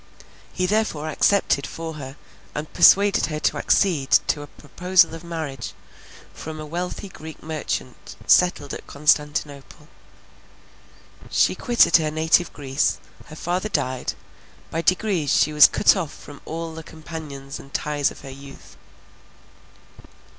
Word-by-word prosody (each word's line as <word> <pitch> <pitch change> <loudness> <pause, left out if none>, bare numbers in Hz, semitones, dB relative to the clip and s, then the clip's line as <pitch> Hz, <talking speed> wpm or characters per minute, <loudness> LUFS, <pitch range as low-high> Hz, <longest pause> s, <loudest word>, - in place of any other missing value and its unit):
He 185 - -1
therefore 180 -7 0
accepted 155 -4 +2
for 165 0 -6
her, 135 -3 -8 0.4
and 150 +1 -5
persuaded 200 +1 +5
her 155 -1 -4
to - - +1
accede 160 -9 +1 0.2
to, 145 - +1
a 145 - -9
proposal 175 +3 +1
of 165 +1 -8
marriage, 160 -7 -5 0.6
from 155 0 -8
a 155 - -6
wealthy 175 +5 -5
Greek 160 -4 -11
merchant 155 -5 -5
settled 175 -6 +3
at - - -8
Constantinople. 150 0 -1 1.4
She - - +3
quitted 235 -10 +4
her 155 -2 -1
native 160 +3 +2
Greece; 135 0 -1 0.3
her 155 - -11
father 180 +6 -2
died; 130 -9 -2 0.6
by 165 - -1
degrees 185 -4 +1
she 155 - +3
was 150 -1 +9
cut - - +4
off 170 -6 -3
from 145 -1 -13
all 165 0 -5
the 160 - -7
companions 155 -4 -9
and 135 - -14
ties 145 -1 0
of - - -13
her 135 - -9
youth. 135 +1 -13
155 Hz, 135 wpm, -23 LUFS, 145-170 Hz, 1.4 s, was